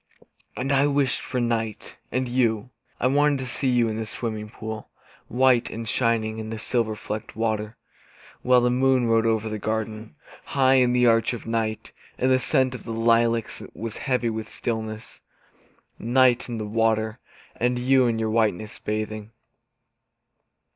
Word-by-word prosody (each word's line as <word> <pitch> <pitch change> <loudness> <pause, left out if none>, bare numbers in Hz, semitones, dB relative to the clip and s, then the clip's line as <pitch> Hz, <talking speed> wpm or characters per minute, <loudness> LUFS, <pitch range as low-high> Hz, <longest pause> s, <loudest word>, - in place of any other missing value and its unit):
And 135 +3 -1
I 140 +1 +4
wished 140 -3 +1
for 125 - -3
night 115 -3 -2 0.2
and 130 0 -1
you. 120 -2 0 0.3
I - - 0
wanted 145 +2 +3
to 130 - -5
see 130 +2 -2
you 120 -2 +3
in 110 -1 -3
the 110 -1 -4
swimming 110 0 -4
pool, 110 0 -7 0.4
White 125 -1 +3
and 115 0 -6
shining 110 -1 0
in 110 0 -5
the 115 - -4
silver 110 -1 -1
flecked 105 0 -6
water. 110 0 -2 0.6
While 125 0 +4
the 125 0 +2
moon 130 0 +3
rode 115 0 +3
over 110 -1 +1
the 110 -1 -4
garden, 110 -2 -4 0.3
High 135 -1 +3
in 125 -1 +3
the 125 0 +3
arch 115 +1 +3
of 120 - -7
night, 110 -1 -2 0.3
And 130 +1 +2
the 130 - +4
scent 130 0 +1
of 125 - -8
the 115 - -5
lilacs 115 0 +1
was 115 -1 -6
heavy 125 -4 0
with 110 -1 -5
stillness. 110 -1 -5 0.8
Night, 125 +1 +3
and 115 -2 -4
the 110 - -3
water, 110 +1 0 0.4
and 125 +1 0
you 130 +1 +3
in 115 -1 0
your 110 -1 -1
whiteness, 110 -2 0
bathing! 110 0 -4
115 Hz, 165 wpm, -24 LUFS, 110-125 Hz, 0.8 s, I